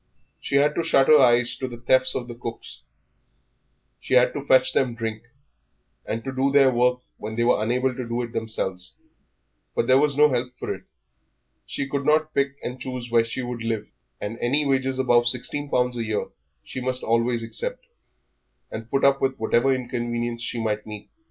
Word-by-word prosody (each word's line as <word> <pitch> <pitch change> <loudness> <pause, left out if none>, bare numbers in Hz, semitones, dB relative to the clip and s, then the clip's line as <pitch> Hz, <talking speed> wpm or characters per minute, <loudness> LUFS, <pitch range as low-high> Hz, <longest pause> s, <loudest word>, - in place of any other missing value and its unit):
She - - -3
had 145 +2 +4
to - - 0
shut 135 -4 +3
her 155 -1 +8
eyes 120 -2 +4
to 130 - -3
the 120 -2 -8
thefts 130 +2 +2
of 125 - -3
cooks; 115 -1 -7 1.2
she 130 - -1
had 125 0 +5
to 145 - -4
fetch 130 -1 +4
them 125 -3 +1
drink, 115 0 -5 0.8
and 115 +1 -3
to 135 - -5
do 135 +1 +1
their 135 -2 +5
work 125 +1 +2 0.2
when 110 +1 -6
they 120 - +1
were 120 -2 +3
unable 125 +3 0
to 125 -1 -6
do 120 +1 -2
it 120 - -7
themselves. 95 -5 -4 0.8
But - - +1
there 130 +2 +5
was 145 -1 +2
no 150 0 +7
help 125 -1 -2
for - - -3
it. - - -12 0.8
She 140 - -3
could 140 0 -2
not 155 +2 +2
pick 140 0 0
and 125 +1 -5
choose 125 -2 -6
where 115 -1 +4
she 125 +3 -4
would 120 -1 -5
live, 115 -2 -2 0.3
and 105 +3 -5
any 140 +5 +2
wages 135 -1 0
above 120 -2 +3
sixteen 140 +4 -2
pound 125 -1 +1
a 120 -1 -3
year 110 -1 -2 0.3
she 130 - -6
must 130 0 -2
always 115 +1 +1
accept, - - -4 0.9
and 110 +1 -7
put 135 - +1
up 135 0 +4
with 135 0 0
whatever 120 +4 +2
inconvenience 120 -2 -2
she 120 0 -3
might 105 -1 -2
meet. 105 -1 -9
125 Hz, 190 wpm, -24 LUFS, 115-135 Hz, 1.2 s, her